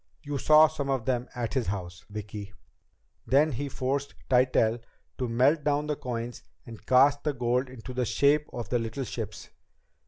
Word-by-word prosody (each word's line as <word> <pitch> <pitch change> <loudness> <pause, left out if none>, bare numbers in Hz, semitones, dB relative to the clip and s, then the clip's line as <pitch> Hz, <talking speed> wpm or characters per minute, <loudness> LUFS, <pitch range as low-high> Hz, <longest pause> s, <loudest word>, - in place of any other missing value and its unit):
You 145 -2 -3
saw 155 +2 +7
some 150 -3 -4
of 130 -4 -1
them 125 -2 -1
at 120 -2 -3
his 130 -4 0
house, 90 -3 -5
Vicki. 105 0 -6
He 100 - -18 0.7
then 140 0 +2
forced 135 +2 -2 0.2
Tytell 125 -2 +3 0.4
to 125 -2 -1
melt 135 +7 +3
down 145 0 +1
the 150 0 -1
coins 120 -2 -5 0.2
and 115 -2 -11
cast 140 +3 +5
the 150 - 0
gold 125 +1 0
in 130 -3 -11
the 125 0 -2
shape 145 +5 +2
of 120 -4 -6
the 120 - +1
little 115 +4 -3
ships. - - -6
130 Hz, 175 wpm, -28 LUFS, 115-140 Hz, 0.7 s, saw